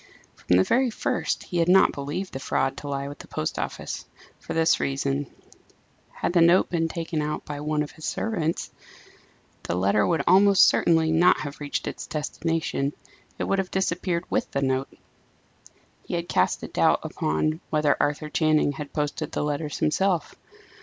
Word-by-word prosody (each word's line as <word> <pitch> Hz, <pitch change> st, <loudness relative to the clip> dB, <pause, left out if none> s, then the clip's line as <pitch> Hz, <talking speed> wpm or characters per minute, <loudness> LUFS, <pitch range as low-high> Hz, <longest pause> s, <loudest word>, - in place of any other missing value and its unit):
From 90 Hz, -, +2 dB
the 95 Hz, -, +5 dB
very 255 Hz, -, +2 dB
first, 220 Hz, -, -2 dB
he 175 Hz, -, -3 dB
had 165 Hz, +1 st, +2 dB
not 190 Hz, +1 st, +6 dB
believed 145 Hz, +7 st, -5 dB
the 135 Hz, -, -4 dB
fraud 135 Hz, 0 st, 0 dB
to 145 Hz, -, -7 dB
lie 140 Hz, 0 st, -3 dB
with 145 Hz, -, -9 dB
the -, -, -11 dB
post 75 Hz, -, -3 dB
office -, -, -4 dB, 0.4 s
for -, -, -6 dB
this 165 Hz, 0 st, +3 dB
reason: 135 Hz, 0 st, -1 dB, 0.8 s
had -, -, -3 dB
the 175 Hz, -, +4 dB
note 170 Hz, +2 st, +5 dB
been 165 Hz, -2 st, +1 dB
taken 165 Hz, -1 st, -3 dB
out 150 Hz, 0 st, -3 dB
by 145 Hz, -1 st, -5 dB
one 150 Hz, 0 st, 0 dB
of 145 Hz, -, -8 dB
its 155 Hz, -, -6 dB
servants, 170 Hz, -7 st, -2 dB, 0.9 s
the -, -, -3 dB
letter 100 Hz, +3 st, +2 dB
would 165 Hz, -, +1 dB
almost 195 Hz, +2 st, +6 dB
certainly 160 Hz, -1 st, +3 dB
not 170 Hz, +3 st, +4 dB
have 145 Hz, -1 st, -6 dB
reached 145 Hz, -1 st, -3 dB
its -, -, -6 dB
destination; 155 Hz, -2 st, -2 dB, 0.4 s
it -, -, -2 dB
would 195 Hz, -, 0 dB
have 190 Hz, -1 st, -2 dB
disappeared 180 Hz, -2 st, -1 dB
with -, -, -1 dB
the 140 Hz, -, -2 dB
note. 130 Hz, 0 st, 0 dB, 1.1 s
He -, -, -4 dB
had 170 Hz, 0 st, -3 dB
cast -, -, +1 dB
a -, -, -4 dB
doubt -, -, +2 dB
upon 155 Hz, -, -1 dB
whether 150 Hz, -2 st, +2 dB
Arthur 150 Hz, +1 st, -1 dB
Channing 155 Hz, -2 st, +2 dB
had 145 Hz, 0 st, -8 dB
posted 150 Hz, -1 st, -2 dB
the -, -, -2 dB
letters 150 Hz, 0 st, -2 dB
himself. 180 Hz, +2 st, +1 dB
155 Hz, 175 wpm, -25 LUFS, 145-170 Hz, 1.1 s, not